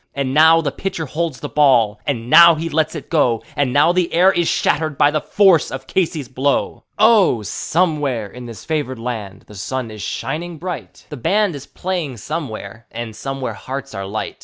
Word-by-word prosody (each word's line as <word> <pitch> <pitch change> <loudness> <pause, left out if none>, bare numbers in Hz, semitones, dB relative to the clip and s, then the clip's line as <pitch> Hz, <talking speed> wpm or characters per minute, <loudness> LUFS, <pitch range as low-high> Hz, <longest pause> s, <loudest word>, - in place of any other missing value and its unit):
And 135 -1 -2
now 160 +2 +6
the 145 -3 -2
pitcher 185 +1 -4
holds 155 -2 -3
the - - -4
ball, 120 -8 +3
and 120 -5 -2
now 170 +4 +8
he 165 +2 -4
lets 160 +1 0
it 155 - -7
go, 125 -8 +1
And 140 -3 0
now 145 +5 +4
the 180 -1 0
air 180 +3 +5
is 175 -3 0
shattered 155 -3 0
by 145 - +4
the 155 0 -1
force 190 -4 +3
of 130 0 -7
Casey's 160 -7 -1
blow. 135 +3 -1
Oh! 210 - +4
somewhere 145 - -1
in 120 +5 -10
this 110 -6 -10
favored 145 -5 -2
land 110 -5 -6
the - - -15
sun 115 +4 -4
is 105 -1 -9
shining 170 - -4
bright; 180 +2 -7
The 150 - -7
band 200 - +1
is 140 -2 -9
playing 175 -9 -4
somewhere, 115 -5 -6
and 115 -1 -7
somewhere 135 +2 -4
hearts 135 +1 -7
are 95 0 -5
light. 110 +2 -5
145 Hz, 190 wpm, -19 LUFS, 120-165 Hz, -, now